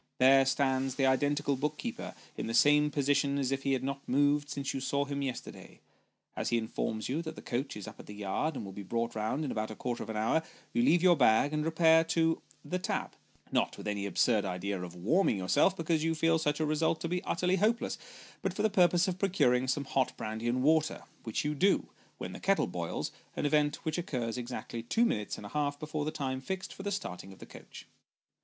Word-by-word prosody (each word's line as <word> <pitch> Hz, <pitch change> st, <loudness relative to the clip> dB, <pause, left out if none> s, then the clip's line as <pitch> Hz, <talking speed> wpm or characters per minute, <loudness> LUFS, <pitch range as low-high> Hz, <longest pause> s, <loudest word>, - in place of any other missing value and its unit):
There 135 Hz, +1 st, +6 dB
stands 135 Hz, -1 st, +1 dB
the 135 Hz, -, +2 dB
identical 145 Hz, +2 st, +2 dB
book 150 Hz, +3 st, -2 dB
keeper -, -, -5 dB, 0.2 s
in -, -, -4 dB
the 115 Hz, -, -1 dB
same 150 Hz, +3 st, +5 dB
position 140 Hz, -1 st, +1 dB
as 135 Hz, -2 st, 0 dB
if 135 Hz, 0 st, -1 dB
he 135 Hz, 0 st, +1 dB
had 130 Hz, -, -1 dB
not 140 Hz, +1 st, -4 dB
moved 145 Hz, +2 st, +2 dB
since 140 Hz, -2 st, -3 dB
you 135 Hz, -, -2 dB
saw 140 Hz, +2 st, 0 dB
him 140 Hz, 0 st, -3 dB
yesterday. 135 Hz, -3 st, -6 dB, 0.6 s
As -, -, -2 dB
he 120 Hz, -, +2 dB
informs 110 Hz, -1 st, -2 dB
you, 145 Hz, +6 st, -1 dB
that 160 Hz, -1 st, -6 dB
the -, -, -9 dB
coach 130 Hz, 0 st, -3 dB
is 105 Hz, -, -7 dB
up -, -, -10 dB
the -, -, -11 dB
yard, 105 Hz, +10 st, -2 dB
and 110 Hz, -, -5 dB
will 95 Hz, -, -7 dB
be 100 Hz, -, -7 dB
brought 115 Hz, +4 st, -2 dB
round 110 Hz, +8 st, -1 dB
in 135 Hz, -, -2 dB
about 110 Hz, 0 st, -2 dB
a 110 Hz, -, -7 dB
quarter 120 Hz, +1 st, -3 dB
of 110 Hz, -, -6 dB
an 110 Hz, -, -3 dB
hour, 110 Hz, +9 st, +2 dB, 0.3 s
you 240 Hz, -, +2 dB
leave 175 Hz, -8 st, +4 dB
your 180 Hz, -2 st, +7 dB
bag, 130 Hz, +1 st, +4 dB
and 150 Hz, 0 st, 0 dB
repair 160 Hz, 0 st, +5 dB
to 165 Hz, 0 st, +1 dB
" -, -, -30 dB
The 180 Hz, -, 0 dB
Tap -, -, -3 dB, 0.2 s
" -, -, -31 dB
not -, -, +1 dB
with -, -, -7 dB
any 100 Hz, -1 st, -1 dB
absurd 105 Hz, +1 st, +2 dB
idea 95 Hz, +1 st, -3 dB
of 90 Hz, -1 st, -7 dB
warming 110 Hz, -, +2 dB
yourself, 95 Hz, -, +3 dB
because 165 Hz, -1 st, 0 dB
you 165 Hz, 0 st, +1 dB
feel 165 Hz, +1 st, +3 dB
such 150 Hz, -1 st, 0 dB
a 155 Hz, -, +1 dB
result 155 Hz, +1 st, +1 dB
to -, -, -2 dB
be 180 Hz, +2 st, -2 dB
utterly 180 Hz, +2 st, +1 dB
hopeless, 225 Hz, +5 st, +1 dB, 0.4 s
but -, -, -2 dB
for -, -, -1 dB
the 215 Hz, -, +3 dB
purpose 180 Hz, -2 st, +4 dB
of 185 Hz, 0 st, -2 dB
procuring 130 Hz, -11 st, +2 dB
some 140 Hz, +2 st, 0 dB
hot 130 Hz, -1 st, 0 dB
brandy 110 Hz, +2 st, -4 dB
and 125 Hz, +2 st, +1 dB
water, 155 Hz, +1 st, +2 dB, 0.2 s
which 110 Hz, +5 st, -2 dB
you 150 Hz, -, 0 dB
do, 190 Hz, +7 st, +2 dB, 0.3 s
when -, -, -5 dB
the -, -, -8 dB
kettle 195 Hz, 0 st, +2 dB
boils! 85 Hz, -1 st, -3 dB, 0.2 s
an -, -, -2 dB
event 150 Hz, +1 st, +1 dB
which 160 Hz, +2 st, -1 dB
occurs 125 Hz, -9 st, -3 dB
exactly 120 Hz, -1 st, -5 dB
two 225 Hz, -, +2 dB
minutes 105 Hz, -, -1 dB
and -, -, -9 dB
a -, -, -7 dB
half 145 Hz, -1 st, -1 dB
before 155 Hz, -1 st, -3 dB
the -, -, 0 dB
time 130 Hz, -3 st, -3 dB
fixed 190 Hz, +7 st, -4 dB
for -, -, -9 dB
the 200 Hz, +1 st, -3 dB
starting 95 Hz, -, -5 dB
of 95 Hz, -, -13 dB
the -, -, -11 dB
coach. -, -, -12 dB
140 Hz, 235 wpm, -31 LUFS, 120-160 Hz, 0.6 s, your